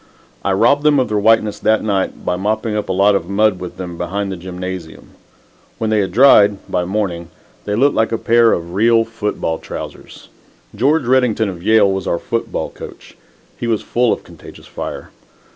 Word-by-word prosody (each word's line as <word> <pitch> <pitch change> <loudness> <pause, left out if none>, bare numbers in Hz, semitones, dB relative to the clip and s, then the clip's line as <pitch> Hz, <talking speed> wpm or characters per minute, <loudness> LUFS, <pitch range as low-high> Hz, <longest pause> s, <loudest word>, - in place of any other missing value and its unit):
I 100 - 0
robbed 120 +9 +3
them 150 -1 +3
of 130 - 0
their 105 -1 0
whiteness 105 -1 +2
that 110 0 +1
night 100 -3 -2
by 90 - 0
mopping 110 +3 -2
up 105 -2 -3
a - - +1
lot 100 +2 +3
of 90 -2 -2
mud 100 -1 +2
with 90 -1 -8
them 90 -2 -7
behind 100 +1 -3
the - - -4
gymnasium. 90 -1 -8 0.7
When 110 -1 -2
they 110 - +2
had 95 -2 -1
dried 105 -3 +6
by 90 -1 -1
morning 90 -4 -3 0.4
they 105 - -1
looked 140 +6 +3
like 110 - +1
a 115 - 0
pair 115 0 +3
of 85 0 -3
real 115 +3 +3
football 105 -7 -3
trousers. - - -9 0.5
George 140 +8 +2
Redington 120 -4 +2
of 90 -3 -8
Yale 110 0 +4
was 95 0 -3
our 85 - 0
football 115 +6 -3
coach. - - -12 0.4
He 120 - -4
was 110 -2 0
full 120 -1 +1
of - - -2
contagious - - -14
fire. - - -7
105 Hz, 190 wpm, -17 LUFS, 95-115 Hz, 0.7 s, dried